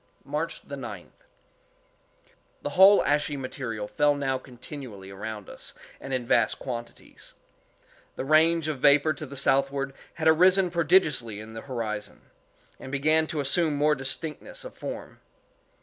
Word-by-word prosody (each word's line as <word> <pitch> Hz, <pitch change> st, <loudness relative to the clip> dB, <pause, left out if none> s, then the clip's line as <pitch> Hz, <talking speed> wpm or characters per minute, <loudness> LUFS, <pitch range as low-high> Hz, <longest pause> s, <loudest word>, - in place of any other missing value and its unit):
March -, -, -4 dB
9th. -, -, -7 dB, 1.5 s
The -, -, -3 dB
whole 195 Hz, +2 st, +7 dB
ashy 145 Hz, 0 st, +1 dB
material 125 Hz, -5 st, -5 dB
fell 145 Hz, +5 st, +2 dB
now 135 Hz, -2 st, -1 dB
continually 125 Hz, -6 st, -10 dB
around 105 Hz, +1 st, -7 dB
us, -, -, -10 dB, 0.2 s
and 135 Hz, -, -8 dB
in 130 Hz, -2 st, -1 dB
vast 115 Hz, -2 st, +3 dB
quantities. 120 Hz, -2 st, -8 dB, 0.8 s
The -, -, -4 dB
range 160 Hz, +2 st, +4 dB
of 150 Hz, -4 st, -3 dB
vapor 145 Hz, +3 st, +5 dB
to 150 Hz, +1 st, -8 dB
the 140 Hz, -, -9 dB
southward 135 Hz, 0 st, +1 dB, 0.2 s
had 160 Hz, -, -1 dB
arisen 180 Hz, +3 st, +5 dB
prodigiously 150 Hz, -, +2 dB
in 110 Hz, +1 st, -9 dB
the 115 Hz, -, -7 dB
horizon, 110 Hz, -5 st, -5 dB, 0.6 s
and 130 Hz, -, -9 dB
began 155 Hz, +3 st, +2 dB
to 155 Hz, -3 st, -2 dB
assume 150 Hz, +2 st, +2 dB
more 150 Hz, +1 st, +3 dB
distinctness 155 Hz, -, -4 dB
of -, -, -8 dB
form. -, -, -7 dB
140 Hz, 135 wpm, -27 LUFS, 120-155 Hz, 1.5 s, whole